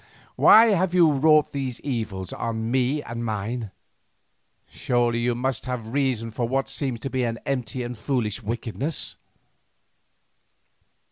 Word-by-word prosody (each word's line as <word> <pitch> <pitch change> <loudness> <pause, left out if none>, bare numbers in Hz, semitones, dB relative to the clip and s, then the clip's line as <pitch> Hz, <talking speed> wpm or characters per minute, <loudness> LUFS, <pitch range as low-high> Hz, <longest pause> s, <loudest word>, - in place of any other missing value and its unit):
Why 225 +1 +7
have 185 -3 +1
you 170 -3 +6
wrought 150 +2 +4
these 130 -3 -4
evils 110 -9 -4
on 115 0 -3
me 130 +3 +1
and 115 0 -5
mine? 110 +1 -3 1.0
Surely 120 -1 0
you 120 0 0
must 130 0 -2
have 125 -2 -3
some 110 - -9
reason 125 -4 0
for 115 +2 -2
what 135 +2 0
seems 130 -6 -3
to 135 - -3
be 130 - 0
an 115 -2 -1
empty 125 -2 -2
and 120 0 -5
foolish 115 -2 -2
wickedness." 120 +7 -3
125 Hz, 140 wpm, -24 LUFS, 115-135 Hz, 1.0 s, Why